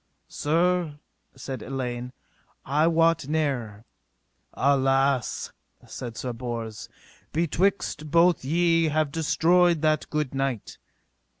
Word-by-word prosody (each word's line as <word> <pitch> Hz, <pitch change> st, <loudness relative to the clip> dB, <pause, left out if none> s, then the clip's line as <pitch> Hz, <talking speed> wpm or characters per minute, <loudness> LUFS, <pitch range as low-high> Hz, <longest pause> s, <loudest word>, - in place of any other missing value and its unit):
Sir, 170 Hz, 0 st, 0 dB, 0.4 s
said 130 Hz, -2 st, -6 dB
Elaine, 125 Hz, -2 st, -4 dB, 0.5 s
I 150 Hz, +4 st, +2 dB
wot 165 Hz, -2 st, +2 dB
ne'er. 130 Hz, -9 st, -2 dB, 0.7 s
Alas, 135 Hz, -2 st, +1 dB, 0.3 s
said 120 Hz, -3 st, -7 dB
Sir 125 Hz, -2 st, -4 dB
Bors, 115 Hz, -2 st, -6 dB, 0.4 s
betwixt 170 Hz, +2 st, 0 dB
you 155 Hz, -, -9 dB
both 170 Hz, +1 st, +3 dB
ye 165 Hz, +3 st, +2 dB
have 155 Hz, -1 st, 0 dB
destroyed 165 Hz, +1 st, +2 dB
that 155 Hz, 0 st, +1 dB
good 150 Hz, -4 st, -2 dB
knight. 135 Hz, -5 st, -3 dB
145 Hz, 100 wpm, -25 LUFS, 130-165 Hz, 0.7 s, both